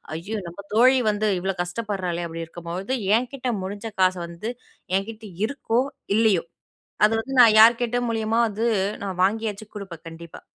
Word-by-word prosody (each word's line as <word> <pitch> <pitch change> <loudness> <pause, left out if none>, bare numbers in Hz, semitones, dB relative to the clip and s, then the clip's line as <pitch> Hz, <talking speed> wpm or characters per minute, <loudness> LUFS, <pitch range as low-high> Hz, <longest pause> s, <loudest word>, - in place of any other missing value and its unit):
"ஐயோ! 205 +7 -4
நம்ம 185 +4 -9
தோழி 255 +3 +6
வந்து 210 +1 +1
இவ்ளோ 190 +1 -2
கஷ்டப்படுறாளே." 180 -2 -3
அப்படி 165 0 -6
இருக்கும்போது 175 +8 -4 0.2
என்கிட்ட 255 +2 -4 0.2
முடிஞ்ச 205 +3 -5
காச 185 0 +4
வந்து. 170 +7 -5 0.5
என்கிட்ட 220 +3 -6 0.2
இருக்கோ, 250 -2 0 0.4
இல்லயோ. 215 -7 +3 0.6
அது 215 - +2
வந்து 270 +3 -6
நான் 220 -3 +7
யார்க்கிட்ட 240 +1 +5
மூலியமா 225 0 0
வந்து 220 +3 -1 0.4
நான் 190 -2 -5
வாங்கியாச்சும் 215 +1 -1
குடுப்பேன் 185 -5 -9
கண்டிப்பா. 165 0 -11
210 Hz, 140 wpm, -24 LUFS, 180-225 Hz, 0.6 s, நான்